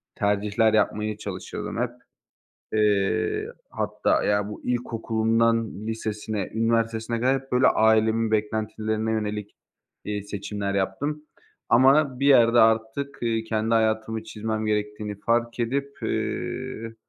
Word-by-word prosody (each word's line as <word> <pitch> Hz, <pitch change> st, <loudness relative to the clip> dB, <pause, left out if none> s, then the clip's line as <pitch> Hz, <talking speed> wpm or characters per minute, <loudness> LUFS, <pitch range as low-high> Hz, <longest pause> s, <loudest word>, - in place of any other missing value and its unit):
tercihler 105 Hz, +2 st, +1 dB
yapmaya 105 Hz, 0 st, +1 dB
çalışıyordum 110 Hz, -, -6 dB
hep. 125 Hz, -, 0 dB, 0.8 s
Eee, 105 Hz, -2 st, +1 dB, 0.2 s
hatta -, -, 0 dB
ya, 105 Hz, 0 st, +1 dB
bu 105 Hz, -, -8 dB
ilkokulundan 115 Hz, -2 st, 0 dB
lisesine, 110 Hz, -2 st, -3 dB
üniversitesine 115 Hz, 0 st, 0 dB
kadar 130 Hz, +2 st, +2 dB
hep, 135 Hz, -, -20 dB
böyle, 125 Hz, +1 st, +4 dB
ailemin 110 Hz, 0 st, +3 dB
beklentilerine 110 Hz, +1 st, -1 dB
yönelik, 105 Hz, -1 st, -3 dB, 0.5 s
iii, 105 Hz, -1 st, -3 dB
seçimler 100 Hz, 0 st, -4 dB
yaptım. 140 Hz, +11 st, -2 dB, 0.5 s
Ama 135 Hz, +1 st, +4 dB
bir 140 Hz, -, +2 dB
yerde 120 Hz, -4 st, +6 dB
artık, 115 Hz, +6 st, +1 dB
ııı, 115 Hz, -1 st, 0 dB
kendi 110 Hz, +1 st, 0 dB
hayatımı 110 Hz, 0 st, 0 dB
çizmem 110 Hz, 0 st, -3 dB
gerektiğini 105 Hz, -1 st, -2 dB
fark 120 Hz, +1 st, 0 dB
edip, 140 Hz, +4 st, -2 dB
eee, 115 Hz, 0 st, -3 dB
110 Hz, 110 wpm, -25 LUFS, 105-115 Hz, 0.8 s, yerde